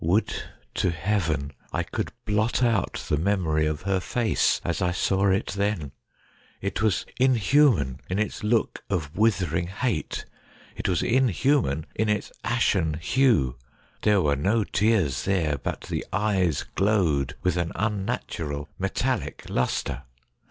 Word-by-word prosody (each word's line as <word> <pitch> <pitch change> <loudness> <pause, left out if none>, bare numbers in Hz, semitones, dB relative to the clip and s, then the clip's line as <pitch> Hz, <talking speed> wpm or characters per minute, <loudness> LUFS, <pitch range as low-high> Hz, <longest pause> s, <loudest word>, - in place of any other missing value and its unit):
Would 95 +8 +2 0.4
to 90 - +1
heaven 85 -6 -1 0.2
I - - 0
could - - -4
blot 110 +4 +1
out 115 -5 0
the 75 - +1
memory 80 -4 +1
of 75 +1 -3
her 95 -1 +1
face 110 +2 +1
as 85 -1 -1
I 90 - +2
saw 95 +2 +1
it 95 +1 +1
then! 100 -8 -1 0.7
It 100 +2 -3
was 110 -4 +1
inhuman 125 - +3
in 90 - -1
its 105 0 -2
look 110 +1 +1
of 80 -7 -2
withering 90 -6 +1
hate 105 -1 -2 0.3
— - - -25
it - - -2
was 90 -3 +1
in 130 +2 +3
human 110 - +1
in 110 0 0
its 105 -1 -1
ashen 95 -9 +1
hue. 85 - +2 0.4
There 105 -3 +3
were 70 -1 +2
no 105 +10 +2
tears 95 - +1
there, 80 -8 +1
but - - -4
the - - -3
eyes 95 -7 +1
glowed 80 -9 +1
with 90 - +2
an 85 -1 -1
unnatural 95 -9 -2
metallic - - -2
lustre. 65 +1 -1
95 Hz, 145 wpm, -26 LUFS, 80-110 Hz, 0.7 s, inhuman